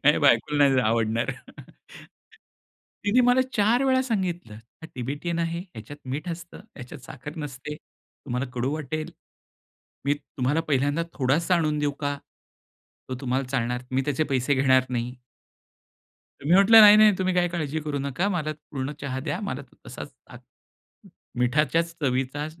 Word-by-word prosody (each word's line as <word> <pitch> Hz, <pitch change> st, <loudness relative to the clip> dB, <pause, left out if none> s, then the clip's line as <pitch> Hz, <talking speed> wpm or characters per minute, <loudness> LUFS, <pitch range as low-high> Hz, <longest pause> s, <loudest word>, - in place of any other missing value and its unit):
नाही 150 Hz, +2 st, +5 dB
बायकोला 145 Hz, +1 st, +3 dB
नाही 135 Hz, -1 st, +3 dB
आवडणार. 115 Hz, 0 st, +1 dB, 1.7 s
तिने 205 Hz, +5 st, +4 dB
मला 245 Hz, +1 st, +5 dB
4 220 Hz, +5 st, +3 dB
वेळा 260 Hz, -1 st, +3 dB
सांगितलं 185 Hz, -, -3 dB, 0.3 s
"हा -, -, -7 dB
तिबेटियन 145 Hz, +7 st, -3 dB
आहे, 170 Hz, 0 st, -1 dB
ह्याच्यात 115 Hz, +7 st, -10 dB
मीठ 145 Hz, +7 st, -4 dB
असतं, 170 Hz, 0 st, -7 dB, 0.2 s
ह्याच्यात 135 Hz, +3 st, -10 dB
साखर 150 Hz, +3 st, -9 dB
नसते, 150 Hz, -1 st, -6 dB
तुम्हाला 135 Hz, -4 st, -7 dB
कडू 125 Hz, +3 st, -1 dB
वाटेल, 155 Hz, +1 st, -4 dB, 0.9 s
मी 140 Hz, +1 st, +2 dB
तुम्हाला 145 Hz, 0 st, -2 dB
पहिल्यांदा 145 Hz, +3 st, +1 dB
थोडासा 150 Hz, +7 st, +1 dB
आणून 155 Hz, -3 st, 0 dB
देऊ 145 Hz, -1 st, 0 dB
का? 145 Hz, -1 st, -1 dB, 0.9 s
तो 130 Hz, -, -3 dB
तुम्हाला 130 Hz, 0 st, -1 dB
चालणार? 125 Hz, -1 st, -1 dB
मी 130 Hz, +1 st, +1 dB
त्याचे 145 Hz, +2 st, 0 dB
पैसे 130 Hz, +2 st, +2 dB
घेणार 130 Hz, -1 st, +3 dB
नाही." 120 Hz, 0 st, -2 dB, 1.3 s
मी 155 Hz, -, +2 dB
म्हंटलं, 200 Hz, +4 st, +8 dB
नाही, 210 Hz, -1 st, +10 dB
नाही. 215 Hz, 0 st, +7 dB
तुम्ही 185 Hz, -1 st, 0 dB
काही 175 Hz, -1 st, +2 dB
काळजी 160 Hz, -3 st, -3 dB
करू 150 Hz, -2 st, -3 dB
नका, 140 Hz, +8 st, -1 dB
मला 160 Hz, -6 st, -1 dB, 0.2 s
पूर्ण 135 Hz, 0 st, -3 dB
चहा 130 Hz, -2 st, -3 dB
द्या, 170 Hz, +7 st, -3 dB
मला 200 Hz, -, -4 dB, 0.2 s
तसाच -, -, -8 dB, 0.2 s
अ, -, -, -12 dB, 1.0 s
मीठाच्याच 150 Hz, +6 st, +1 dB
चवीचा 135 Hz, +2 st, -1 dB
145 Hz, 145 wpm, -25 LUFS, 130-170 Hz, 1.7 s, नाही